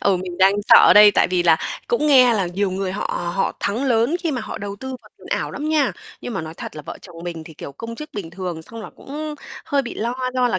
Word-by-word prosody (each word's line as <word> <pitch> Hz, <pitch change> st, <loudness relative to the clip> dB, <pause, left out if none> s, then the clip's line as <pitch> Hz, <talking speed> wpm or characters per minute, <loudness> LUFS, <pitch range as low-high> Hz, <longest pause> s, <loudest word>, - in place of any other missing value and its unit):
Ừ, 195 Hz, -2 st, +2 dB
mình 180 Hz, 0 st, -6 dB
đang 190 Hz, +1 st, +5 dB
sợ -, -, +8 dB
đây, 210 Hz, 0 st, +9 dB
tại -, -, +2 dB
vì 180 Hz, -1 st, +1 dB
là 165 Hz, -2 st, +5 dB, 0.3 s
cũng 475 Hz, -11 st, +1 dB
nghe 255 Hz, -5 st, +6 dB
là 195 Hz, -4 st, 0 dB
nhiều 190 Hz, +2 st, -1 dB
người 190 Hz, 0 st, -3 dB
họ 175 Hz, -3 st, -3 dB
họ 195 Hz, -, +1 dB
thắng 225 Hz, +7 st, -1 dB
lớn 245 Hz, +5 st, +2 dB
khi 335 Hz, -3 st, -1 dB
mà 255 Hz, -4 st, -2 dB
họ -, -, -6 dB
đầu 200 Hz, 0 st, -6 dB
tư 265 Hz, +5 st, -8 dB
vào -, -, -18 dB
tiền -, -, -15 dB
ảo -, -, -1 dB
lắm 300 Hz, +2 st, -4 dB
nha. 300 Hz, -4 st, +2 dB, 0.3 s
Nhưng 245 Hz, -, -6 dB
mà -, -, -2 dB
nói 160 Hz, +1 st, -8 dB
thật -, -, -8 dB
là 150 Hz, -, -7 dB
vợ -, -, -8 dB
chồng 175 Hz, -3 st, -13 dB
mình 165 Hz, -2 st, -6 dB
thì, 160 Hz, -1 st, -12 dB
kiểu, 140 Hz, -, -9 dB
công 230 Hz, +10 st, -7 dB
chức 305 Hz, +6 st, -9 dB
bình 180 Hz, -6 st, -6 dB
thường, 175 Hz, -3 st, -5 dB
xong 230 Hz, +6 st, -10 dB
là -, -, -9 dB
cũng 300 Hz, +2 st, -6 dB, 0.3 s
hơi 280 Hz, -1 st, +1 dB
bị 240 Hz, -, -7 dB
lo 235 Hz, +3 st, -2 dB, 0.2 s
do 250 Hz, -1 st, +2 dB
là, 185 Hz, -, 0 dB
205 Hz, 280 wpm, -21 LUFS, 180-255 Hz, 0.3 s, đây